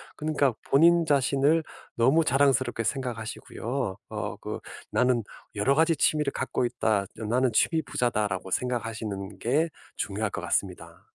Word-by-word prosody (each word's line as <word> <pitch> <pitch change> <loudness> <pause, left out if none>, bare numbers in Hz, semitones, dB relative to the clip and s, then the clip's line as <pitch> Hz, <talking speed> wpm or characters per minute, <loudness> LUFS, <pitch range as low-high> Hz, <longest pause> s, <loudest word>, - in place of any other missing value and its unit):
그니까 150 -4 +1 0.2
본인 170 +4 +6
자신을 145 +2 +3 0.3
너무 135 +8 +4
자랑스럽게 130 -4 +2
생각하시고요. 115 -2 -3
어 - - -4
그 - - -5 0.3
'나는 125 -2 +2 0.3
여러 105 +7 +2
가지 160 +3 +3
취미를 150 -1 +2
갖고 130 -1 -1
있다. 110 -4 0
어 110 - -4
나는 125 +3 +2
취미 160 +8 +3
부자다.'라고 105 -9 -1
생각하시는 110 -5 -3
게 145 - +1 0.3
중요할 105 +1 -2
것 - - -5
같습니다. 85 -3 -3
125 Hz, 320 characters per minute, -27 LUFS, 110-140 Hz, 0.3 s, 본인